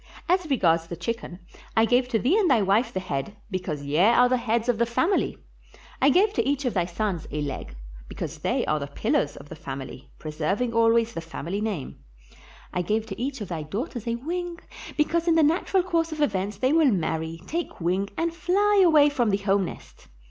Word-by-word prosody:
As 360 -2 +1
regards 165 - +2
the 170 - -5
chicken, 230 -2 -4 0.4
I 225 - +6
gave 245 +2 +2
to 240 - +1
thee 255 - +2
and 415 -5 +3
thy 235 -6 +4
wife 215 +5 +2
the 190 - -2
head, 185 +2 -4
because 175 -6 -3
ye 145 +3 -1
are 235 +6 +6
the 255 - +2
heads 235 -1 0
of 240 -3 +1
the 235 - +2
family; 330 - +1 0.6
I 275 - +6
gave 400 +8 +4
to - - +1
each 280 0 -1
of 250 - 0
thy 180 -3 +1
sons 180 -1 -3
a 150 - -3
leg, 135 - -5 0.3
because - - -6
they - - 0
are 155 - 0
the 140 - -4
pillars 145 +1 0
of - - -11
the - - -8
family, 135 -2 -8
preserving 165 +10 -2
always 230 0 +3
the 165 - -4
family 170 +4 -5
name; 200 - -4 0.7
I 180 - 0
gave 215 +5 0
to 215 0 -7
each 265 -1 -3
of 205 - -5
thy 165 -3 -3
daughters 225 - -5
a 230 - 0
wing, 345 +7 -4 0.4
because 335 +3 +1
in 330 - +4
the 325 - +5
natural 350 +4 +2
course 335 -2 0
of 310 - -5
events 200 -7 0
they 260 +7 +2
will 320 -3 +5
marry, 160 -3 -2
take 340 +2 -4
wing, 185 +3 0
and 330 0 0
fly 395 +4 +3
away 310 -4 +6
from 250 -6 +1
the 195 - +2
home 200 -1 +1
nest. - - -11
225 Hz, 210 wpm, -25 LUFS, 175-290 Hz, 0.7 s, I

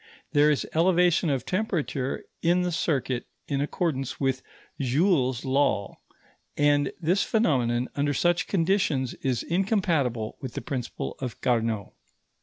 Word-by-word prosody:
There 145 +1 +5
is 150 - +1
elevation 175 0 +3
of 135 -4 -1
temperature 175 - -2 0.2
in 175 +2 +3
the 180 - -1
circuit 135 -7 -1 0.2
in 140 -1 -1
accordance 145 -3 -2
with 135 -1 0 0.4
Joule's 135 - +1
law; 130 -7 +1 0.6
and 145 -1 +3
this 175 +4 +2
phenomenon, 125 - +1
under 145 0 0
such 175 +2 +2
conditions, 165 -8 +1
is 130 -3 0
incompatible 165 - 0
with 130 -3 -6
the - - -3
principle 130 -7 -4
of 125 -4 -5
Carnot. 115 -4 0
145 Hz, 125 wpm, -26 LUFS, 130-175 Hz, 0.6 s, There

